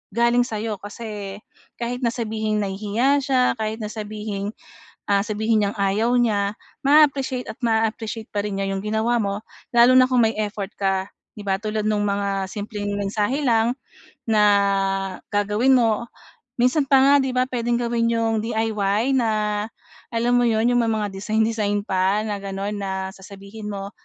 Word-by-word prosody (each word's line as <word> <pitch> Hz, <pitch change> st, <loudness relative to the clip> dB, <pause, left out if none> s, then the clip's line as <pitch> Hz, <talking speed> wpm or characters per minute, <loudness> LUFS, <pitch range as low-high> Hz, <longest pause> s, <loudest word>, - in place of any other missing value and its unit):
galing 235 Hz, +1 st, +3 dB
sa'yo 215 Hz, 0 st, -3 dB
kasi, 205 Hz, -2 st, -7 dB, 0.4 s
kahit 245 Hz, +1 st, -3 dB
na 235 Hz, -, +3 dB
sabihing 220 Hz, -2 st, -2 dB
nahihiya 215 Hz, +8 st, +1 dB
siya, 260 Hz, -2 st, +2 dB, 0.2 s
kahit 220 Hz, +1 st, -2 dB
na 210 Hz, -, -4 dB
sabihing, 210 Hz, -2 st, -5 dB, 0.6 s
ah, 200 Hz, 0 st, +4 dB
sabihin 220 Hz, 0 st, +1 dB
niyang 200 Hz, +1 st, -2 dB
ayaw 205 Hz, +4 st, +1 dB
niya, 205 Hz, -3 st, +1 dB, 0.3 s
maa-appreciate 275 Hz, -3 st, +3 dB
at -, -, -13 dB
maa-appreciate 225 Hz, 0 st, -1 dB
pa 205 Hz, -1 st, -1 dB
rin 195 Hz, -1 st, -3 dB
niya 195 Hz, -, -1 dB
'yung 195 Hz, +1 st, -3 dB
ginawa 220 Hz, +3 st, 0 dB
mo 200 Hz, 0 st, -2 dB, 0.4 s
lalo 240 Hz, +2 st, +7 dB
na 255 Hz, -, +8 dB
kung 250 Hz, -1 st, +3 dB
may 225 Hz, 0 st, +1 dB
effort 205 Hz, -2 st, -3 dB
ka, 195 Hz, -1 st, 0 dB, 0.3 s
'di 210 Hz, -, -9 dB
ba? 190 Hz, -, +2 dB
Tulad 215 Hz, 0 st, -2 dB
nung 210 Hz, -1 st, +1 dB
mga 200 Hz, -1 st, -1 dB
simpleng 205 Hz, -1 st, -4 dB
mensahe 210 Hz, +8 st, -1 dB
lang, 230 Hz, +1 st, +3 dB, 0.5 s
na 215 Hz, -2 st, +4 dB, 0.9 s
gagawin 210 Hz, +6 st, +3 dB
mo. 235 Hz, -1 st, +2 dB, 0.5 s
Minsan 265 Hz, +4 st, +2 dB
pa 270 Hz, -, +7 dB
nga, 275 Hz, +2 st, +6 dB
'di 265 Hz, -, -1 dB
ba, 255 Hz, 0 st, +2 dB
puwedeng 240 Hz, -1 st, 0 dB
gawin 235 Hz, -1 st, 0 dB
'yung 225 Hz, -1 st, +1 dB
DIY 220 Hz, +2 st, 0 dB
na, 210 Hz, -2 st, 0 dB, 0.5 s
alam 235 Hz, +1 st, +1 dB
mo 245 Hz, -, +3 dB
'yun, 220 Hz, 0 st, +2 dB
yung 245 Hz, -, +4 dB
may 230 Hz, -, +1 dB
mga 215 Hz, -1 st, 0 dB
design-design 215 Hz, 0 st, 0 dB
pa 190 Hz, +3 st, +1 dB
na 210 Hz, -, -2 dB
gano'n 195 Hz, +1 st, -4 dB
na, 195 Hz, -1 st, -3 dB, 0.2 s
sasabihin 200 Hz, +2 st, -9 dB
mo, 195 Hz, 0 st, -5 dB
215 Hz, 160 wpm, -22 LUFS, 205-235 Hz, 0.9 s, na